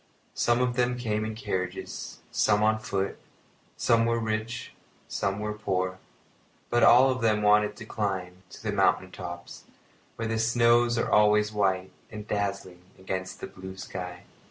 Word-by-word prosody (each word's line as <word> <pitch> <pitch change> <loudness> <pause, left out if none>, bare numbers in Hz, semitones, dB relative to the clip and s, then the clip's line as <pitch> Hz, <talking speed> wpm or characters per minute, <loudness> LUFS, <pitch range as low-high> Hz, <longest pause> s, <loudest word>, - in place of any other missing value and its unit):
Some 120 +1 +2
of 125 -1 0
them 125 0 +1
came 110 -3 -1
in 110 0 -4
carriages, 95 -6 -4
some 105 0 +3
on 110 0 +3
foot; 100 -3 -2 0.6
some 115 0 +3
were 115 0 +2
rich, 110 +1 -3 0.3
some 100 0 -1
were 105 0 -3
poor; 95 -3 -2 0.7
but 120 0 +3
all 130 +2 +7
of 130 -1 -3
them 105 -2 +2
wanted 105 0 +4
to 110 - -9
climb 95 -4 -3
to - - -12
the 110 - -1
mountain 95 -2 +2
tops, 85 -1 -8 0.5
where 115 - -3
the 110 0 -1
snows 120 +1 +3
are 115 - 0
always 105 0 +4
white 95 -2 0 0.2
and 105 -1 -8
dazzling 100 -3 -3 0.2
against 95 0 -5
the - - -3
blue 95 0 -10
sky. 90 -2 -7
105 Hz, 155 wpm, -27 LUFS, 95-115 Hz, 0.7 s, all